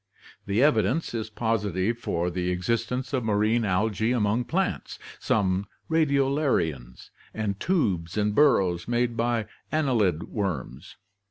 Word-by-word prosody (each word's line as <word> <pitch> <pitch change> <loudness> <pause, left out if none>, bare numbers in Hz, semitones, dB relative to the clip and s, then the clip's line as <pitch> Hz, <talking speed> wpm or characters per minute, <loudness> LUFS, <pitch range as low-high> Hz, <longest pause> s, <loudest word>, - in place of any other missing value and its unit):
The 100 +6 +2
evidence 125 - +2
is 110 -2 -3
positive 105 -2 -1
for 90 -5 -1
the 90 0 -2
existence 115 +9 -2
of 130 -3 0
marine 110 +2 +2
algae 105 +3 +1
among 115 +1 +1
plants, 190 +6 -2 0.2
some 95 -1 0 0.2
radio 140 -4 +3
larians, 80 - -1 0.2
and 105 -2 -2
tubes 95 - 0
and 105 0 +1
burrows 95 - +3
made 120 0 0
by 115 -1 0 0.3
annelid 120 - +1
worms. 85 - -4
110 Hz, 120 wpm, -26 LUFS, 95-125 Hz, 0.3 s, radio